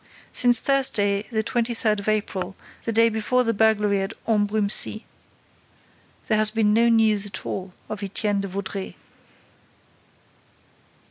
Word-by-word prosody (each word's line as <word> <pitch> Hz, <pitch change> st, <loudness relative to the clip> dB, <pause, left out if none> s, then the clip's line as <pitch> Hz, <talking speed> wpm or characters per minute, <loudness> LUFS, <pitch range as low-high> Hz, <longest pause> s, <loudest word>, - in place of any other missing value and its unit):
Since 245 Hz, -2 st, +4 dB
Thursday 210 Hz, -7 st, +2 dB
the 220 Hz, -2 st, -1 dB
twenty 235 Hz, +1 st, -1 dB
third 215 Hz, -2 st, +2 dB
of 200 Hz, -, -8 dB
April, 200 Hz, -3 st, -2 dB, 0.3 s
the 230 Hz, -, -1 dB
day 230 Hz, +1 st, +4 dB
before 230 Hz, +3 st, 0 dB
the 230 Hz, -1 st, 0 dB
burglary 210 Hz, -2 st, +2 dB
at 195 Hz, -, -5 dB
Ambrumésy, 210 Hz, 0 st, 0 dB, 1.2 s
there 215 Hz, -1 st, +2 dB
has 215 Hz, 0 st, +3 dB
been 215 Hz, -1 st, +1 dB
no 230 Hz, +2 st, +3 dB
news 215 Hz, -3 st, +3 dB
at 190 Hz, -2 st, -8 dB
all 190 Hz, -1 st, -5 dB, 0.2 s
of 215 Hz, -, -6 dB
Étienne 200 Hz, 0 st, -1 dB
de 195 Hz, -, -4 dB
Vaudreix. 195 Hz, 0 st, -6 dB
215 Hz, 135 wpm, -23 LUFS, 200-225 Hz, 1.2 s, Since